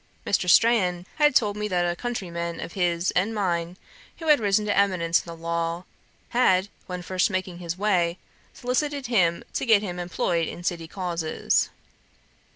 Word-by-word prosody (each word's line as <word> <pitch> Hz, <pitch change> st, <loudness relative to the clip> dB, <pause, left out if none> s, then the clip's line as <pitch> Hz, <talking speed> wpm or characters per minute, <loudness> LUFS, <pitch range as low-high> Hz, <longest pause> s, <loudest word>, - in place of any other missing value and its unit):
Mr. 185 Hz, -2 st, +1 dB
Strahan 185 Hz, -5 st, +4 dB
had 295 Hz, -3 st, +4 dB
told 205 Hz, -3 st, +3 dB
me 210 Hz, 0 st, -2 dB
that 180 Hz, -3 st, +1 dB
a 175 Hz, -, -1 dB
countryman 170 Hz, -7 st, -4 dB
of -, -, -6 dB
his 175 Hz, -1 st, 0 dB
and 200 Hz, +5 st, 0 dB
mine, 175 Hz, -3 st, -1 dB, 0.4 s
who 325 Hz, -2 st, -4 dB
had 300 Hz, -, +7 dB
risen 210 Hz, 0 st, +2 dB
to 205 Hz, -, 0 dB
eminence 180 Hz, -4 st, +2 dB
in -, -, -19 dB
the 170 Hz, -, -7 dB
law, 170 Hz, +1 st, -2 dB, 0.5 s
had, 200 Hz, -6 st, +3 dB, 0.2 s
when 180 Hz, -1 st, -5 dB
first 185 Hz, +3 st, +1 dB
making 185 Hz, -2 st, -3 dB
his 170 Hz, 0 st, -4 dB
way, 180 Hz, -4 st, +1 dB, 0.3 s
solicited 280 Hz, +3 st, -2 dB
him 180 Hz, -9 st, +2 dB
to -, -, -1 dB
get 220 Hz, -4 st, +4 dB
him 180 Hz, -3 st, -4 dB
employed 175 Hz, -2 st, -1 dB
in 175 Hz, -, -7 dB
city 170 Hz, -2 st, -2 dB
causes. 170 Hz, -3 st, -1 dB
180 Hz, 165 wpm, -25 LUFS, 170-210 Hz, 0.5 s, had